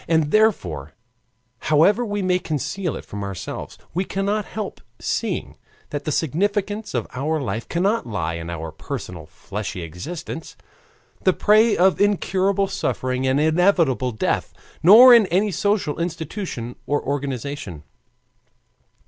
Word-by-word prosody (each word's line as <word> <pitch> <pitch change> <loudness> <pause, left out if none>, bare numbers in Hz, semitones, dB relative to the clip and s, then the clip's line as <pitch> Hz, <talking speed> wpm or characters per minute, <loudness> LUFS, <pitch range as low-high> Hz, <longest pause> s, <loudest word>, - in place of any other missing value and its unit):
And 160 -2 +2
therefore, 90 - +1 0.7
however 170 +10 +3
we 205 -3 -2
may 180 0 +2
conceal 165 +2 -3
it - - -8
from 100 0 -6
ourselves, 100 -3 -6 0.2
we 185 - 0
cannot 200 +2 -1
help 215 -3 -6 0.2
seeing - - -2 0.3
that 145 -1 -4
the 155 - -1
significance 205 - -1
of 120 - 0
our 155 +5 -1
life 115 -4 -4
cannot 195 - 0
lie 90 -7 -2
in 85 0 -6
our 80 -1 -5
personal 80 +1 -7
fleshly 95 +2 -6
existence, 155 - -7 0.7
the 185 - +4
prey 215 +3 +4
of 185 +2 +3
incurable 200 -1 +2
suffering 130 -9 -2
and 130 +2 +2
inevitable 160 -5 +2
death, 110 - -2 0.3
nor 235 +8 +9
in 230 -4 +6
any 195 +4 +1
social 195 -4 0
institution 160 - -4
or 145 0 +1
organization. 140 - -4
160 Hz, 130 wpm, -22 LUFS, 125-200 Hz, 0.7 s, nor